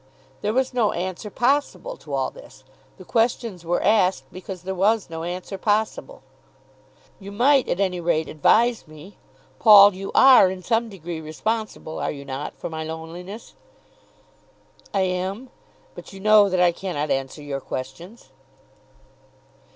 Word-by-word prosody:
There 210 - -1
was 260 +2 0
no 235 -4 +1
answer 185 +4 -5
possible 285 - -1
to - - -13
all - - -1
this. - - -15 0.3
The - - -13
questions 230 -5 -1
were 175 +1 -1
asked 195 -3 +2
because 185 -1 -9
there 190 +1 -4
was 200 0 +1
no 165 0 -5
answer 180 +3 -6
possible. 220 - -2 1.0
"You 200 0 -10
might 260 +6 +3
at 175 - -1
any 185 -3 0
rate 160 -2 0
advise 225 +8 +2
me. 155 +6 -14 0.4
Paul, 205 -2 +8
you 195 +1 -7
are 260 -8 +7
in 185 0 -7
some 230 +1 0
degree 175 -4 -7
responsible, 205 +2 -4
are - - -2
you 140 -1 -9
not, 135 +1 -6
for - - -6
my 160 -1 -5
loneliness?" 165 +6 -8 1.4
"I 195 - 0
am. 190 +7 -3 0.4
But - - -12
you 195 - -10
know 210 0 +5
that 185 -1 0
I 180 -1 +4
cannot 170 -4 -4
answer 135 +2 -3
your 140 -1 -5
questions." 170 - -8
190 Hz, 150 wpm, -23 LUFS, 170-220 Hz, 1.4 s, Paul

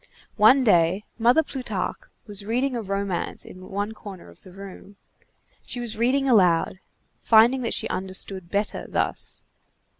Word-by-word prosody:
One 240 +6 +6
day, 185 -1 +3
Mother 245 +8 +4
Plutarque 235 -10 -5 0.2
was 205 -2 -6
reading 250 +5 0
a 235 - -2
romance 195 -2 -3
in 185 0 -12
one 205 +2 -2
corner 200 - -11
of 85 - -18
the 185 - -14
room. 195 +1 -11 0.7
She 245 - -3
was 235 -2 -4
reading 260 +4 +1
aloud, 185 -6 +3 0.4
finding 235 +4 +5
that 235 - -1
she - - -2
understood 190 -1 -4
better 205 +2 -2
thus. - - -2
205 Hz, 145 wpm, -24 LUFS, 190-240 Hz, 0.7 s, One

